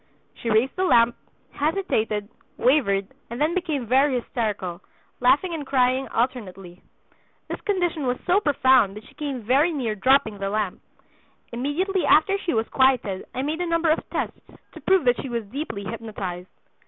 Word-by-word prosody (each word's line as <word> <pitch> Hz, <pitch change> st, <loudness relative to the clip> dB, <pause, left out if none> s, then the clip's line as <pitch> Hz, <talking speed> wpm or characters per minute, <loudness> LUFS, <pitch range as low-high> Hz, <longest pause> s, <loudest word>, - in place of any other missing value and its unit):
She 235 Hz, -, -5 dB
raised 225 Hz, +4 st, +2 dB
the 370 Hz, -, 0 dB
lamp, 235 Hz, -9 st, +4 dB, 0.4 s
hesitated, 250 Hz, -, -1 dB, 0.3 s
wavered, 200 Hz, -8 st, +2 dB, 0.2 s
and 235 Hz, +2 st, -6 dB
then 305 Hz, +3 st, +2 dB
became 315 Hz, -8 st, -2 dB
very 265 Hz, +3 st, +3 dB
hysterical, 205 Hz, -8 st, -3 dB, 0.4 s
laughing 290 Hz, +8 st, +3 dB
and 315 Hz, -3 st, -4 dB
crying 260 Hz, -1 st, +1 dB
alternately. 195 Hz, -7 st, -3 dB, 0.7 s
This -, -, -5 dB
condition 350 Hz, -8 st, -1 dB
was 250 Hz, 0 st, 0 dB
so 370 Hz, +2 st, +4 dB
profound 260 Hz, -, +3 dB
that 215 Hz, -, -11 dB
she -, -, -17 dB
came 280 Hz, -4 st, -4 dB
very 275 Hz, +9 st, +3 dB
near 255 Hz, -8 st, -2 dB
dropping 220 Hz, -1 st, +2 dB
the 195 Hz, 0 st, -2 dB
lamp. 210 Hz, -2 st, -2 dB, 0.7 s
Immediately 320 Hz, +10 st, -1 dB
after 390 Hz, +6 st, +5 dB
she 345 Hz, -8 st, -2 dB
was 225 Hz, 0 st, 0 dB
quieted 255 Hz, -8 st, +2 dB
I 260 Hz, -, -1 dB
made 310 Hz, +4 st, -2 dB
a 355 Hz, -, -1 dB
number 335 Hz, -1 st, +2 dB
of 315 Hz, -, +2 dB
tests -, -, -3 dB, 0.3 s
to -, -, -12 dB
prove 380 Hz, -6 st, +3 dB
that 245 Hz, -1 st, +3 dB
she 270 Hz, -, -6 dB
was 235 Hz, -2 st, -3 dB
deeply 250 Hz, -8 st, -4 dB
hypnotized. 195 Hz, -4 st, -6 dB
255 Hz, 165 wpm, -24 LUFS, 215-305 Hz, 0.7 s, after